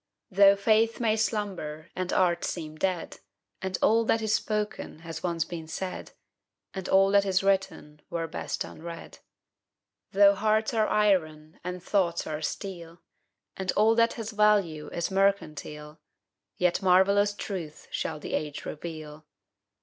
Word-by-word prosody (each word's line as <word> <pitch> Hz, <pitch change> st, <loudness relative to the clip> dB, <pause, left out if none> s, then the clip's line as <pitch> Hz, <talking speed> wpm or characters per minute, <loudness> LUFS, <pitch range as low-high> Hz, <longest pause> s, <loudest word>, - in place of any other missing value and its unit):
Though 200 Hz, +1 st, +7 dB
faith 220 Hz, +3 st, +2 dB
may 220 Hz, -2 st, +2 dB
slumber 195 Hz, -8 st, -3 dB
and 185 Hz, 0 st, -3 dB
art 175 Hz, -2 st, +2 dB
seem 155 Hz, -3 st, -4 dB
dead, 180 Hz, +1 st, -2 dB, 0.4 s
And 190 Hz, -1 st, -2 dB
all 225 Hz, +1 st, +4 dB
that 225 Hz, 0 st, +1 dB
is 215 Hz, -1 st, +1 dB
spoken 210 Hz, -7 st, -2 dB
has 165 Hz, -1 st, -7 dB
once 170 Hz, -2 st, -1 dB
been 165 Hz, -2 st, -7 dB
said, 185 Hz, +3 st, -5 dB, 0.6 s
And 190 Hz, -1 st, -5 dB
all 195 Hz, 0 st, +5 dB
that 200 Hz, 0 st, +5 dB
is 190 Hz, -1 st, +1 dB
written 190 Hz, -6 st, -1 dB
were 165 Hz, -1 st, -2 dB
best 165 Hz, -, -4 dB
unread; 170 Hz, +1 st, -9 dB, 0.9 s
Though 200 Hz, 0 st, +6 dB
hearts 215 Hz, +2 st, +1 dB
are 220 Hz, -2 st, +2 dB
iron 160 Hz, -7 st, +1 dB
and 180 Hz, 0 st, -5 dB
thoughts 180 Hz, -4 st, 0 dB
are 155 Hz, 0 st, -4 dB
steel, 170 Hz, -1 st, -6 dB, 0.5 s
And 190 Hz, -1 st, -1 dB
all 215 Hz, +2 st, +4 dB
that 230 Hz, 0 st, +3 dB
has 225 Hz, -1 st, -5 dB
value 205 Hz, -8 st, +2 dB
is 170 Hz, +2 st, -3 dB
mercantile, 155 Hz, -6 st, -1 dB, 0.6 s
Yet 180 Hz, +1 st, +1 dB
marvellous 200 Hz, +2 st, +4 dB
truths 175 Hz, -8 st, -6 dB
shall 155 Hz, -1 st, -3 dB
the -, -, -7 dB
age 150 Hz, -1 st, -3 dB
reveal. 155 Hz, -1 st, -8 dB
185 Hz, 140 wpm, -27 LUFS, 165-205 Hz, 0.9 s, Though